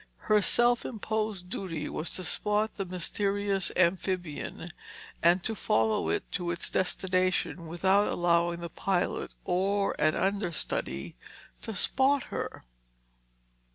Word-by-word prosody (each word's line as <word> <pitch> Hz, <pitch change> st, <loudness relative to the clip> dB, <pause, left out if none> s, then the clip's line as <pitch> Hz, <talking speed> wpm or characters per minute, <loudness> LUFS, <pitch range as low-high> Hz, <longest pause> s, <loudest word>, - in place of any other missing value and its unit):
Her 210 Hz, -1 st, +6 dB
self 240 Hz, +4 st, +3 dB
imposed 215 Hz, -4 st, -3 dB
duty 165 Hz, -5 st, -4 dB
was 160 Hz, -, -3 dB
to 185 Hz, -, -2 dB
spot 210 Hz, +4 st, +1 dB
the 195 Hz, -, -4 dB
mysterious 195 Hz, +2 st, 0 dB
amphibian 175 Hz, -2 st, -1 dB, 0.5 s
and 175 Hz, +2 st, +4 dB
to 225 Hz, -, -1 dB
follow 110 Hz, -, +1 dB
it 80 Hz, -, 0 dB
to 175 Hz, -3 st, -2 dB
its 170 Hz, +1 st, -2 dB
destination 185 Hz, -2 st, 0 dB
without 190 Hz, +5 st, +3 dB
allowing 170 Hz, 0 st, +1 dB
the 170 Hz, -, -5 dB
pilot 180 Hz, +2 st, -1 dB, 0.2 s
or 195 Hz, +3 st, +1 dB
an 155 Hz, +1 st, +3 dB
understudy 175 Hz, -, -2 dB, 0.4 s
to 220 Hz, -, -5 dB
spot 265 Hz, +7 st, +2 dB
her. -, -, -4 dB
185 Hz, 120 wpm, -29 LUFS, 170-205 Hz, 0.5 s, Her